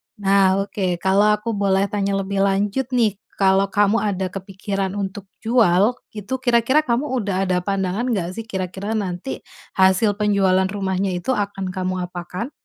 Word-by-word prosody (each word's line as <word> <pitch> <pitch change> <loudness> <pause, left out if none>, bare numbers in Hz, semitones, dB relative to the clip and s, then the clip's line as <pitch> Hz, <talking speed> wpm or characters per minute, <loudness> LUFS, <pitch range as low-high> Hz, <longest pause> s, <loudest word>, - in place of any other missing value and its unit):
Nah 195 -1 +3
oke. 190 -3 -2
Kalau 195 +2 +4
aku 210 +2 -4
boleh 195 -1 +2
tanya 200 -1 0
lebih 195 0 -2
lanjut 200 +6 0
nih, 220 -5 +2 0.2
kalau 195 0 +3
kamu 205 +2 +2
ada 190 -3 -1
kepikiran 195 0 -4
untuk 200 0 -4 0.2
jual, 225 -1 +3 0.2
itu 210 +4 -6
kira-kira 245 +2 +3
kamu 255 +3 0
udah 195 -3 -1
ada 180 -1 +2
pandangan 195 +3 -1
enggak 195 -8 -1
sih 225 - -5
kira-kira 190 +1 -4
nanti, 195 +3 -4 0.3
hasil 190 +2 +4
penjualan 200 -3 +2
rumahnya 190 -1 -1
itu 180 +8 -1
akan 200 -2 -3
kamu 185 -1 -2
apakan? 180 +8 -6
195 Hz, 150 wpm, -21 LUFS, 190-210 Hz, 0.3 s, Kalau